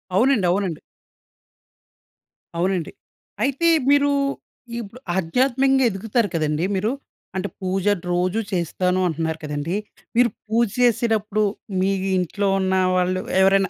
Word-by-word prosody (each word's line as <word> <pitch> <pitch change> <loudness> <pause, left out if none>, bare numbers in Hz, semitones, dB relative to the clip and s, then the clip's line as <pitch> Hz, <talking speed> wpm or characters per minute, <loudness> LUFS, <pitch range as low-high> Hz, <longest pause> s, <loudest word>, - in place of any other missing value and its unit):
అవునండి. 235 -1 +3
అవునండి. 180 -4 -1 1.8
అవునండి. 180 -1 0 0.5
అయితే 275 +5 +1 0.2
మీరు 285 0 +4 0.7
ఇప్పుడు 230 +2 -9 0.2
ఆధ్యాత్మికంగా 265 +8 +2
ఎదుగుతారు 210 +3 0
కదండీ 155 +1 0
మీరు. 210 +4 0 0.4
అంటే 190 +2 -1
పూజ 185 +1 -1 0.3
రోజూ 180 +4 +1
చేస్తాను 180 +1 0
అంటున్నారు 160 -1 -2
కదండీ. 150 +4 -3 0.4
మీరు 240 0 +5 0.2
పూజ 230 +2 +2
చేసేటప్పుడు 220 -3 +2 0.4
మీ 190 +1 +2 0.3
ఇంట్లో 195 +3 -1
ఉన్న 190 0 0 0.2
వాళ్ళు 185 0 +1 0.2
ఎవరైనా 195 0 +4
195 Hz, 105 wpm, -22 LUFS, 180-230 Hz, 1.8 s, మీరు